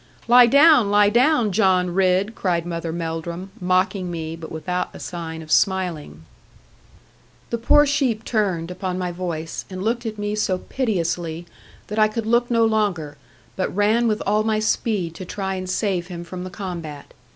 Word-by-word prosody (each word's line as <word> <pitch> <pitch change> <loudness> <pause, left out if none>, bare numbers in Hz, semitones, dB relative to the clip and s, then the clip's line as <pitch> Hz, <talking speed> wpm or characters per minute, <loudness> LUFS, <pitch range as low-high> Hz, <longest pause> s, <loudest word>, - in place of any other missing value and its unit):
'Lie 245 0 +8
down, 280 -4 +6
lie 205 0 +5
down, 245 -1 +3
John 185 -3 +2
Ridd!' 190 +3 +2
cried 175 -5 -1
Mother 170 -1 -4
Melldrum, 170 +2 -5
mocking 185 +1 +1
me, 165 -1 -5
but 165 -1 -10
without 180 +3 -3
a - - -9
sign 160 -2 -6
of 155 - -11
smiling. 170 - 0 1.3
The 235 - -1
poor 295 +6 +5
sheep 265 -6 0
turned, 185 -7 -1
upon 180 0 -4
my 180 -1 -2
voice, 170 -3 -5
and 185 0 -6
looked 235 +2 -1
at 215 -1 -5
me 205 0 -2
so 205 -3 0
piteously 175 -8 -2 0.4
that 210 +1 -4
I 215 - +6
could 225 +1 -4
look 235 +2 +2
no 230 -1 +3
longer; 200 -9 0 0.4
but 185 - -1
ran 215 +4 +3
with 215 -1 0
all 210 +2 +2
my 220 0 +1
speed 215 -5 -1
to 185 - -8
try 190 +1 -4
and 185 -1 -5
save 185 -2 -1
him 175 -2 -7
from 180 +1 -7
the - - -6
combat. 170 -6 -7
190 Hz, 175 wpm, -22 LUFS, 170-215 Hz, 1.3 s, Lie